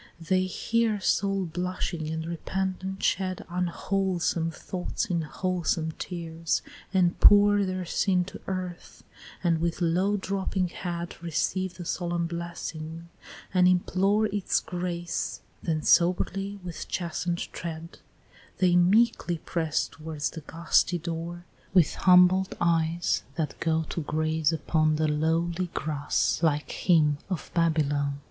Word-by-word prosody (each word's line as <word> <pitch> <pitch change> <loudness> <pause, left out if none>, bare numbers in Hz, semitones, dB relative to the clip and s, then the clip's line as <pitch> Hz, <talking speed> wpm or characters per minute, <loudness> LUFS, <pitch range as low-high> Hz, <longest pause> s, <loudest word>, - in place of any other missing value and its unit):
They 185 +2 +1
hear, 225 +3 0
soul 195 0 +1
blushing, 175 -2 -3
and 160 0 -3
repentant 190 +3 -3
shed 185 -1 0
Unwholesome 180 -1 0
thoughts 180 +2 -4
in 175 -4 -1
wholesome 165 -1 -1
tears, 165 -2 -2 0.3
and 185 -2 +2
pour 205 0 +7
Their 185 -1 -2
sin 180 +1 +1
to 195 - -10
earth, 185 -2 -5 0.4
and 165 -2 +2
with 170 0 -1
low 185 +4 +2
drooping 190 -1 -1
head 170 -1 -5
Receive 175 +2 -1
the 175 0 -8
solemn 175 0 -1
blessing, 165 -1 -6 0.4
and 180 -1 +5
implore 190 +4 +2
Its 205 -2 0
grace 175 -1 -3 0.2
then 155 -2 -1
soberly 195 +3 +2
with 175 -2 -6
chasten'd 175 0 -3
tread, 165 0 -7 0.6
They 180 -2 +3
meekly 185 0 +3
press 160 -1 -1
towards 155 -2 -4
the 160 - -8
gusty 170 +3 +1
door 170 +1 -5 0.3
With 175 -5 +5
humbled 185 +1 +5
eyes 170 0 +1
that 160 -3 -3
go 160 -1 +1
to 170 - -3
graze 155 +1 0
upon 155 -1 +1
The 155 0 +1
lowly 165 +4 0
grass 145 -1 0
like 150 -3 +1
him 150 -5 +3
of 185 -4 -4
Babylon. 145 -4 +1
175 Hz, 125 wpm, -27 LUFS, 160-185 Hz, 0.6 s, pour